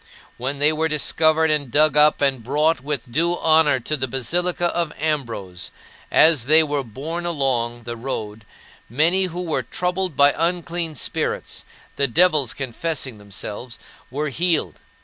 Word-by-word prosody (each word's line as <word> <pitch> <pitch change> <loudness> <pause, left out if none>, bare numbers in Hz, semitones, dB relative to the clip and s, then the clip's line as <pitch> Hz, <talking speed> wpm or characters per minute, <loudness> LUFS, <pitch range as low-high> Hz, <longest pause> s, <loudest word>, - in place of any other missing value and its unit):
When 135 +3 -3
they 150 +2 +3
were 160 +1 0
discovered 155 +1 +2
and 145 -4 0
dug 150 +3 +3
up 150 0 +4
and 135 -4 +1
brought 150 +4 +1
with 135 -4 -4
due 170 +6 +1
honor 155 -4 +3
to 155 - -1
the 130 -2 -2
basilica 175 +7 -1
of 170 -3 -1
Ambrose, 115 - -3 0.4
as 155 -7 +5
they 160 +2 +6
were 145 -2 -2
borne 145 +9 -6
along 120 -7 -1
the 120 0 -5
road 110 -3 -5 0.5
many 165 - +2
who 180 0 -4
were 155 -5 0
troubled 180 +4 -2
by 145 0 +6
unclean 170 -1 -2
spirits - - -3 0.3
the 140 - +2
devils 150 -2 +3
confessing 130 -2 -3
themselves 105 +4 -7 0.3
were 150 +3 -3
healed. 170 +5 -1
150 Hz, 150 wpm, -21 LUFS, 130-160 Hz, 0.5 s, they